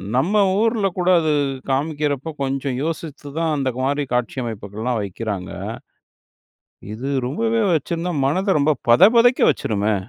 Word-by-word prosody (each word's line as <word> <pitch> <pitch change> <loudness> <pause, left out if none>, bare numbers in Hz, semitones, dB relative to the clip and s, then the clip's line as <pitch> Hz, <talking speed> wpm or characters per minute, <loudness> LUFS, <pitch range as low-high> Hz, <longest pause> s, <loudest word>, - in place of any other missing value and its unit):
நம்ம 155 +11 +1 0.3
ஊர்ல 220 -2 +2
கூட 180 0 +1
அது, 155 -2 +1 0.4
காமிக்கிறப்போ 145 +1 -1
கொஞ்சம் 135 -1 -2
யோசித்து 155 -2 -5
தான் 165 -1 0
அந்த 135 -2 0
மாரி 140 +2 0
காட்சி 125 +1 -1
அமைப்புகள்லாம் 110 +1 -4
வைக்கிறாங்க.இது 100 -1 -5 1.6
ரொம்பவே 225 - 0
வச்சிருந்தா, 170 +3 -2
மனத 190 +6 +1
ரொம்ப 150 +1 +3 0.2
பதபதைக்க 230 - +6
வச்சிருமே? 105 0 -1
145 Hz, 115 wpm, -21 LUFS, 125-175 Hz, 1.6 s, பதபதைக்க